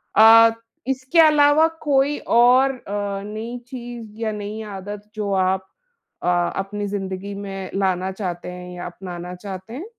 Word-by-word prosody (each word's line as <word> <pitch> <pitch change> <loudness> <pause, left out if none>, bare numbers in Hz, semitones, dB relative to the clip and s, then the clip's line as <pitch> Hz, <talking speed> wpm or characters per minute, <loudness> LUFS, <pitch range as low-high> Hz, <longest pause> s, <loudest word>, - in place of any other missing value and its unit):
अ, 225 +1 +8 0.4
इसके 265 +5 0
अलावा 305 0 +6
कोई 285 0 +2
और 250 +3 +5
अ, 205 -5 -4
नई 220 +3 -5
चीज़ 240 -3 -8
या 220 -1 0
नई 210 +1 -5 0.2
आदत, 205 +2 -8
जो 210 -2 -2
आप 190 0 +1 0.6
अ, - - -1 0.3
अपनी 205 +1 -3
ज़िंदगी 195 0 -4
में 195 -1 -6
लाना 190 -1 0
चाहते 180 -3 -5
हैं 180 0 -9
या 175 - -6
अपनाना 175 0 -7
चाहते 190 +3 -8
हैं? 310 +10 -6
205 Hz, 145 wpm, -22 LUFS, 190-240 Hz, 0.6 s, अ